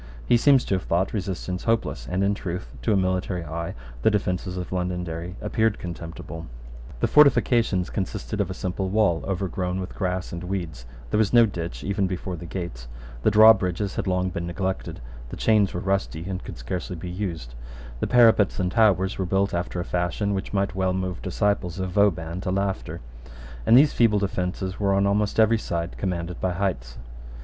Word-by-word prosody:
He -, -, +4 dB
seems 135 Hz, +2 st, +5 dB
to -, -, -1 dB
have 95 Hz, -, +1 dB
thought 90 Hz, +3 st, 0 dB
resistance 95 Hz, -2 st, -3 dB
hopeless; 110 Hz, -, 0 dB
and 95 Hz, +2 st, 0 dB
in 100 Hz, +1 st, +2 dB
truth, 90 Hz, -2 st, -5 dB
to 115 Hz, -, 0 dB
a 100 Hz, -, +4 dB
military 95 Hz, -1 st, -1 dB
eye, 85 Hz, +2 st, -4 dB, 0.3 s
the -, -, +5 dB
defences 90 Hz, -3 st, -1 dB
of 90 Hz, -, -5 dB
Londonderry 90 Hz, -1 st, -3 dB
appeared 110 Hz, 0 st, +1 dB
contemptible. 85 Hz, -1 st, -7 dB, 0.5 s
The -, -, +3 dB
fortifications 120 Hz, -10 st, +4 dB
consisted 95 Hz, -, -3 dB
of -, -, -1 dB
a -, -, -4 dB
simple 95 Hz, +1 st, -3 dB
wall 100 Hz, -5 st, +2 dB
overgrown 95 Hz, -1 st, -2 dB
with 95 Hz, -, -5 dB
grass 95 Hz, -2 st, -2 dB
and 85 Hz, 0 st, -5 dB
weeds: 85 Hz, -10 st, -4 dB, 0.2 s
there -, -, +2 dB
was 110 Hz, 0 st, +2 dB
no 120 Hz, -1 st, +8 dB
ditch 85 Hz, -, -5 dB
even 100 Hz, -1 st, 0 dB
before 90 Hz, 0 st, -4 dB
the 85 Hz, +1 st, -8 dB
gates: 80 Hz, -10 st, -6 dB, 0.3 s
the -, -, +4 dB
drawbridges 105 Hz, -3 st, +5 dB
had -, -, -2 dB
long 90 Hz, 0 st, 0 dB
been 85 Hz, -2 st, -4 dB
neglected: 95 Hz, -3 st, -3 dB, 0.3 s
the -, -, -7 dB
chains 105 Hz, -3 st, +3 dB
were 90 Hz, -, -4 dB
rusty 95 Hz, -3 st, -2 dB
and 95 Hz, -1 st, -4 dB
could -, -, -8 dB
scarcely 90 Hz, +9 st, -4 dB
be 85 Hz, +2 st, -7 dB
used: 85 Hz, -9 st, -4 dB, 0.5 s
the -, -, -1 dB
parapets 115 Hz, -5 st, +5 dB
and 90 Hz, -1 st, 0 dB
towers 95 Hz, -5 st, +3 dB
were 95 Hz, -, 0 dB
built 95 Hz, +2 st, +1 dB
after 90 Hz, +1 st, -2 dB
a 90 Hz, -, -3 dB
fashion 90 Hz, +4 st, -1 dB
which 95 Hz, 0 st, -3 dB
might 100 Hz, -1 st, 0 dB
well 95 Hz, 0 st, 0 dB
move 95 Hz, -1 st, -3 dB
disciples 95 Hz, -2 st, -1 dB
of 95 Hz, -1 st, -3 dB
Vauban 90 Hz, -3 st, +1 dB
to 95 Hz, -, -3 dB
laughter; 95 Hz, 0 st, -2 dB, 0.7 s
and 115 Hz, -, +8 dB
these 145 Hz, +2 st, +6 dB
feeble 115 Hz, -3 st, +4 dB
defences 95 Hz, -1 st, -2 dB
were 100 Hz, -1 st, +2 dB
on 100 Hz, 0 st, +3 dB
almost 105 Hz, +2 st, +1 dB
every 110 Hz, +1 st, +5 dB
side 85 Hz, -3 st, -3 dB
commanded 90 Hz, -2 st, -3 dB
by 90 Hz, -1 st, 0 dB
heights. 75 Hz, -11 st, -2 dB
95 Hz, 185 wpm, -25 LUFS, 90-100 Hz, 0.7 s, no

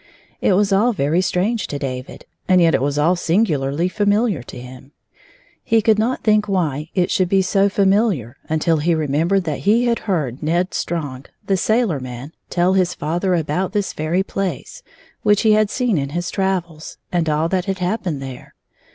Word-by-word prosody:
It -, -, +3 dB
was 200 Hz, +1 st, +2 dB
all 225 Hz, +5 st, +3 dB
very 160 Hz, 0 st, +1 dB
strange 195 Hz, +5 st, 0 dB
to 145 Hz, -, -4 dB
David, 130 Hz, -2 st, -6 dB, 0.2 s
and 185 Hz, -1 st, +5 dB
yet 165 Hz, -2 st, +4 dB
it -, -, +2 dB
was 140 Hz, +1 st, -1 dB
all 165 Hz, +5 st, +3 dB
singularly 165 Hz, -4 st, 0 dB
familiar 205 Hz, -, +1 dB
to 125 Hz, +1 st, -10 dB
him. 130 Hz, +2 st, -12 dB, 0.7 s
He 225 Hz, -, +3 dB
could 215 Hz, 0 st, +3 dB
not 240 Hz, +4 st, -1 dB
think 210 Hz, -1 st, +3 dB
why 155 Hz, -6 st, -1 dB
it 180 Hz, -2 st, +1 dB
should 185 Hz, -2 st, +1 dB
be 195 Hz, 0 st, +3 dB
so 195 Hz, +2 st, +2 dB
familiar 195 Hz, -, +1 dB
until 160 Hz, +1 st, +1 dB
he 165 Hz, +3 st, +1 dB
remem 155 Hz, +1 st, 0 dB
bered 195 Hz, -1 st, +2 dB
that 155 Hz, -5 st, -3 dB
he 225 Hz, +5 st, +2 dB
had 235 Hz, -1 st, +1 dB
heard 145 Hz, -9 st, -1 dB
Ned 175 Hz, +4 st, 0 dB
Strong, 145 Hz, -6 st, -4 dB, 0.2 s
the 195 Hz, -, +1 dB
sailor 215 Hz, -, +1 dB
man, 130 Hz, +2 st, -8 dB, 0.2 s
tell 180 Hz, +1 st, +2 dB
his 185 Hz, -2 st, +1 dB
father 175 Hz, +5 st, -1 dB
about 170 Hz, +4 st, -1 dB
this 205 Hz, -2 st, -1 dB
very 160 Hz, +5 st, 0 dB
place, 195 Hz, -, -4 dB, 0.4 s
which 205 Hz, 0 st, +3 dB
he 220 Hz, -, +4 dB
had 215 Hz, -1 st, +3 dB
seen 240 Hz, -, 0 dB
in 140 Hz, 0 st, -3 dB
his 175 Hz, +4 st, -3 dB
travels, 175 Hz, -5 st, -3 dB
and 170 Hz, -3 st, 0 dB
all 155 Hz, +2 st, +1 dB
that 185 Hz, -1 st, 0 dB
had 195 Hz, -1 st, -2 dB
hap 185 Hz, +4 st, -2 dB
pened 150 Hz, -6 st, -2 dB
there. 135 Hz, -2 st, -9 dB
180 Hz, 190 wpm, -20 LUFS, 150-200 Hz, 0.7 s, and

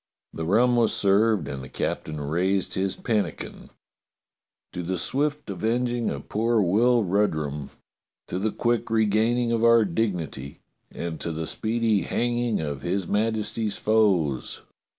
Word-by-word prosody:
The 80 Hz, -, -4 dB
rum 120 Hz, +7 st, +3 dB
was 115 Hz, -2 st, +3 dB
served 100 Hz, -4 st, +3 dB
and 70 Hz, -, -5 dB
the 65 Hz, -, -9 dB
captain 75 Hz, +3 st, -3 dB
raised 90 Hz, +6 st, 0 dB
his 95 Hz, 0 st, 0 dB
pan 110 Hz, -3 st, +1 dB
nikin: 80 Hz, -, -9 dB, 1.0 s
"To 90 Hz, -, -4 dB
the 90 Hz, +2 st, -2 dB
swift 145 Hz, -, -1 dB
avenging 120 Hz, +5 st, -1 dB
of -, -, -6 dB
poor 115 Hz, +2 st, +1 dB
Will 115 Hz, +5 st, +3 dB
Rudrum, 80 Hz, -8 st, -1 dB, 0.6 s
to 90 Hz, -, -3 dB
the 110 Hz, +3 st, 0 dB
quick 120 Hz, +1 st, 0 dB
regaining 115 Hz, +2 st, +2 dB
of 115 Hz, -1 st, +1 dB
our 115 Hz, -1 st, +6 dB
dignity, 85 Hz, -8 st, -3 dB, 0.3 s
and 85 Hz, -2 st, -5 dB
to 85 Hz, -, -3 dB
the 80 Hz, 0 st, -4 dB
speedy 110 Hz, +1 st, 0 dB
hang 120 Hz, 0 st, -1 dB
ing 120 Hz, -6 st, 0 dB
of 75 Hz, -3 st, -4 dB
his 90 Hz, +3 st, -2 dB
Majesty's 110 Hz, 0 st, -1 dB
foes!" 95 Hz, -11 st, +1 dB
105 Hz, 145 wpm, -25 LUFS, 85-115 Hz, 1.0 s, our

